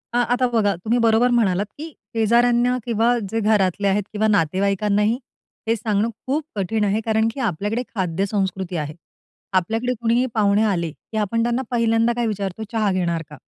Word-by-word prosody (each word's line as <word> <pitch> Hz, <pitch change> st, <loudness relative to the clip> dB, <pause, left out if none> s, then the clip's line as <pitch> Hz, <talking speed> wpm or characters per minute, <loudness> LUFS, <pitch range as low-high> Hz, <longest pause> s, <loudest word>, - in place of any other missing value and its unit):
हां, 245 Hz, -, +4 dB
आता 250 Hz, 0 st, +2 dB
बघा 205 Hz, -3 st, +3 dB
तुम्ही 220 Hz, +8 st, 0 dB
बरोबर 230 Hz, +2 st, +4 dB
म्हणालात, 205 Hz, -5 st, +2 dB
की 320 Hz, +2 st, -7 dB, 0.2 s
शेजाऱ्यांना 240 Hz, +2 st, +3 dB
किंवा 235 Hz, +1 st, +2 dB
जे 225 Hz, -, 0 dB
घरातले 200 Hz, -2 st, +2 dB
आहेत 205 Hz, +1 st, +2 dB
किंवा 215 Hz, +1 st, +1 dB
नातेवाईकांनाही 200 Hz, +4 st, +1 dB, 0.5 s
हे 225 Hz, -, +3 dB
सांगणं 215 Hz, 0 st, 0 dB, 0.2 s
खूप 290 Hz, +4 st, 0 dB
कठीण 210 Hz, +2 st, -1 dB
आहे 205 Hz, +2 st, +1 dB
कारण 220 Hz, 0 st, +2 dB
की -, -, -8 dB
आपल्याकडे 210 Hz, +1 st, -1 dB
खाद्य 190 Hz, -1 st, -1 dB
संस्कृती 190 Hz, -3 st, -2 dB
आहे. 150 Hz, -1 st, -3 dB, 0.6 s
आपल्याकडे 225 Hz, +7 st, 0 dB
कोणीही 235 Hz, +2 st, +2 dB
पाहुणे 205 Hz, 0 st, +3 dB
आले, 175 Hz, -6 st, 0 dB
की 220 Hz, +7 st, -9 dB
आपण 225 Hz, +2 st, 0 dB
त्यांना 240 Hz, +2 st, 0 dB
पहिल्यांदा 230 Hz, 0 st, +2 dB
काय 240 Hz, 0 st, -1 dB
विचारतो? 200 Hz, -1 st, -3 dB
"चहा 215 Hz, -3 st, +1 dB
घेणार 170 Hz, -3 st, 0 dB
का?" 150 Hz, -, -11 dB
215 Hz, 170 wpm, -22 LUFS, 195-235 Hz, 0.6 s, हां